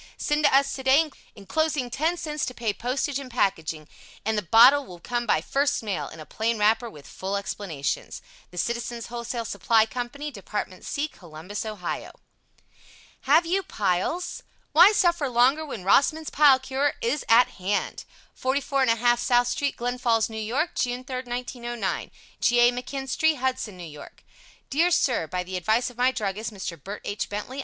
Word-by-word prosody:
Send 295 0 0
to - - +5
us 275 0 +3
today, 275 +4 +3 0.2
enclosing 270 +4 -1
10c 310 0 -1
to 250 - -4
pay 225 -3 -1
postage 265 +4 -2
and 270 -2 -8
packing, 160 -9 -1 0.4
and 220 +1 +1
the 210 - +1
bottle 240 +9 +7
will 180 -8 -12
come 240 +5 -3
by 155 - +3
first 280 - 0
mail 185 -9 -2
in 160 - -12
a 155 - -8
plain 225 +5 -1
wrapper 220 +3 +2
with 145 -8 -14
full 195 +1 -3
explanations. 170 -6 -4 0.3
The 180 - -14
Citizens' 235 +3 -3
Wholesale 235 0 -4
Supply 220 +2 +2
Co. 245 +2 -4
Department 230 -9 -6
C. 295 +1 -2
Columbus, 180 - -8
Ohio 205 -5 -5 1.2
Have 335 - +6
You 370 +4 +1
Piles? 210 - -2 0.3
Why 345 +7 +8
Suffer 345 -8 +2
Longer 255 +6 +3
When 255 -11 -7
ROSSMAN'S 310 - +3
PILE 285 -3 +6
CURE 265 +2 -1
IS 250 +6 0
AT 235 +2 +6
HAND 200 +3 -2 0.3
44 270 0 0
1/2 240 +1 +3
South 245 0 +3
St., 285 +3 -1
Glens 245 +1 -3
Falls, 225 -2 +2
N. - - -7
Y., 230 +8 0
June 245 +1 -1
3, 255 0 -6
1909. 240 -3 -4 0.3
G. 240 - +3
A. 240 0 +6
McKinstry, 270 +5 -1
Hudson, 250 -7 -2
N. 165 -4 -8
Y. 150 - -10 0.6
Dear 325 +6 +3
Sir: 255 - +1
By 180 +2 -3
the 185 +1 -5
advice 220 +8 +1
of 240 - -20
my 250 +1 +4
druggist, 215 -1 -3
Mr. 190 -4 -7
Bert 200 +2 -7
H. 205 - -3
Bentley. 210 +6 -5
240 Hz, 165 wpm, -25 LUFS, 205-275 Hz, 1.2 s, Why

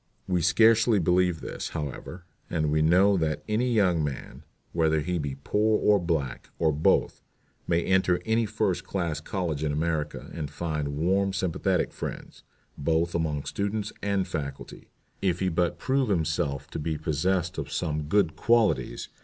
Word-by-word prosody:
We 90 -2 +1
scarcely 110 +6 +5
believe 90 -1 +2
this, - - -5
however, 80 +4 -6 0.2
and 75 -3 0
we 75 0 +2
know 95 +5 +5
that 75 -2 -1
any 115 +4 +1
young 90 -8 +3
man, 70 -3 -5 0.3
whether 80 -2 +2
he 90 +4 -2
be 70 -3 -3
poor 105 +10 +1
or 105 -1 +4
black, 80 -8 -2
or 80 -1 +2
both, 75 +1 +1 0.5
may 85 0 +2
enter 95 -1 +2
any 110 0 +1
first - - -1
class 85 -6 -2
college 85 -5 -3
in 75 - 0
America 75 0 -2
and 75 -4 -4
find 75 -2 -3
warm 95 +4 +1
sympathetic 95 -3 0
friends, - - -7 0.4
both 80 +3 +1
among 75 -4 -1
students 100 +1 -3
and 100 -2 0
faculty, 70 -2 -6 0.3
if 95 -3 +1
he 95 - +1
but 85 0 0
prove 135 -2 0
himself 75 -5 -1
to - - -4
be 80 0 -2
possessed 90 +4 -1
of - - -5
some 75 -3 -2
good 90 -1 +2
qualities 115 -2 +1
85 Hz, 155 wpm, -27 LUFS, 75-95 Hz, 0.5 s, scarcely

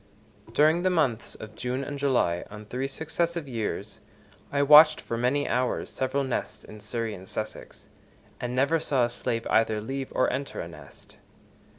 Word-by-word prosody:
During 155 +7 +4
the 185 - +2
months 140 -10 0
of 110 0 -10
June 125 +4 -3
and 145 0 -5
July, 125 -11 +1
on 105 +1 -10
three 125 +5 -3
successive 160 +2 -2
years, 110 -4 -4 0.5
I 140 0 +2
watched 150 +2 +8
for 115 - -4
many 125 +5 +1
hours 125 0 -1
several 130 +1 -1
nests 130 -2 -3
in 110 - -11
Surrey 115 +1 -3
and 95 -1 -10
Sussex, 110 0 -7 0.5
and 125 0 -3
never 140 +5 +3
saw 130 -5 +2
a - - -3
slave 115 -1 -2
either 110 -1 +3
leave 135 +5 -5
or 130 - +2
enter 140 +2 -4
a - - -4
nest. 75 -4 -14
125 Hz, 170 wpm, -27 LUFS, 110-140 Hz, 0.5 s, watched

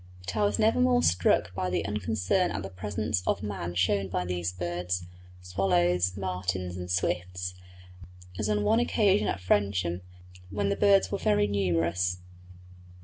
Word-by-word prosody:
But 95 - -4
I 105 - +1
was 100 0 +2
never 220 +3 +3
more 250 -1 +3
struck 85 0 +2
by 90 -1 -2
the 90 - -1
unconcern 105 - 0
at - - -4
the 95 - -7
presence 105 +2 -2
of - - 0
man 95 -4 -4
shown 95 +2 +1
by 90 -1 -2
these 90 -1 -2
birds 90 0 -3 0.4
swallows, 90 0 +1
martins, 90 -1 -3
and 90 -1 -6
swifts 90 0 -1 0.9
as 105 0 -1
on 105 -1 +1
one 225 - +3
occasion 200 - +2
at - - -1
Frensham, 90 -2 0 0.5
when 100 +1 -1
the 100 - +1
birds 200 -1 +4
were 200 - -1
very 105 0 +2
numerous. 90 -2 0
95 Hz, 155 wpm, -28 LUFS, 90-105 Hz, 0.9 s, birds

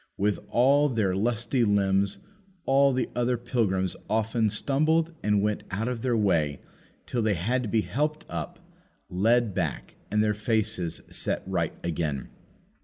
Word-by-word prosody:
With 105 0 +1
all 140 +4 +4
their 105 -7 0
lusty 120 +4 0
limbs, 100 -1 +2 0.5
all 140 +1 +4
the 130 -1 0
other 120 0 +1
pilgrims 105 -7 0
often 110 +1 +1
stumbled 155 +9 +1
and 105 -1 +2
went 105 0 0
out 105 +4 -2
of 125 -2 -3
their 120 -2 +1
way 80 -9 +1 0.5
till 120 - -2
they 110 -2 +1
had 115 +10 0
to 115 - -4
be 110 0 +2
helped 150 - -2
up, - - -5 0.5
led 115 +3 +2
back, 85 -7 -3
and 105 +1 +2
their 105 -1 +2
faces 105 -5 -1
set - - -1
right - - -1
again. 80 -5 -2
110 Hz, 150 wpm, -27 LUFS, 95-125 Hz, 0.5 s, all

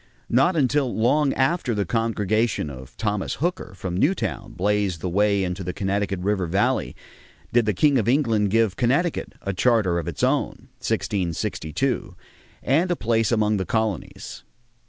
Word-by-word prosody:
Not 135 +10 +4
until 140 -3 +2
long 135 +6 +2
after 135 -3 +1
the 100 -1 0
congregation 110 -3 0
of 65 -1 -11
Thomas 105 -3 -1
Hooker 170 - -3
from 95 -1 -4
Newtown 150 - -1
blazed 100 -1 0
the - - -2
way 100 +2 +2
into 90 +1 -3
the 90 0 -4
Connecticut 100 0 -1
River 95 -2 0
Valley 95 +5 0 0.6
did 120 -2 +3
the 105 - +2
king 140 - +4
of 110 +1 0
England 115 -7 +2
give 110 -2 +2
Connecticut 140 +8 0
a 100 - -2
charter 100 -4 +2
of 85 - -6
its 85 - -4
own - - 0
(1662) 90 - -2 0.5
and 160 +8 +2
a 175 - +1
place 115 -4 +1
among 110 -2 +2
the 95 - -1
colonies. 110 -6 -3
105 Hz, 155 wpm, -23 LUFS, 95-125 Hz, 0.6 s, Not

